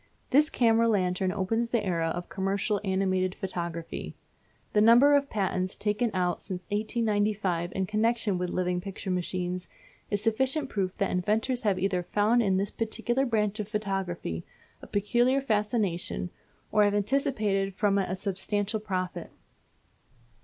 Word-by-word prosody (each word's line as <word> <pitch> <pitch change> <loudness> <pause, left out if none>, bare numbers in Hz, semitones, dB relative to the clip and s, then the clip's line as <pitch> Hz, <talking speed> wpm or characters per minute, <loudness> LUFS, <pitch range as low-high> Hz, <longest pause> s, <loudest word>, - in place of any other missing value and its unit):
This 300 +3 +5
camera 230 -1 +3
lantern 185 -3 +1
opens 225 +5 -1
the 235 -3 0
era 170 -3 0
of 175 +2 -3
commercial 200 +1 -1
animated 190 -1 0
photography. 170 -3 -5 0.6
The 210 - +4
number 240 +6 +7
of 280 0 +1
patents 185 -2 -1
taken 210 +3 0
out 180 -1 0
since 185 -2 -4
1895 205 -5 0
in 190 - 0
connection 215 -1 +1
with 180 0 -1
living 180 0 -1
picture 195 0 -5
machines 180 0 -2 0.4
is 205 - 0
sufficient 265 +7 0
proof 190 -3 -2
that 195 - 0
inventors 220 +7 0
have 205 -5 +1
either 185 -1 0
found 210 +6 +2
in 195 -4 +2
this 195 +1 -1
particular 240 +4 -1
branch 215 -2 0
of 210 - -3
photography 195 - -3 0.4
a - - -11
peculiar 240 +6 +2
fascination, 210 -7 -1 0.4
or 210 - +5
have 205 0 +2
anticipated 205 -4 0
from 200 -1 +2
it 195 - -1
a 185 - -1
substantial 200 +2 -1
profit. 185 -4 -3
205 Hz, 145 wpm, -28 LUFS, 185-225 Hz, 0.6 s, number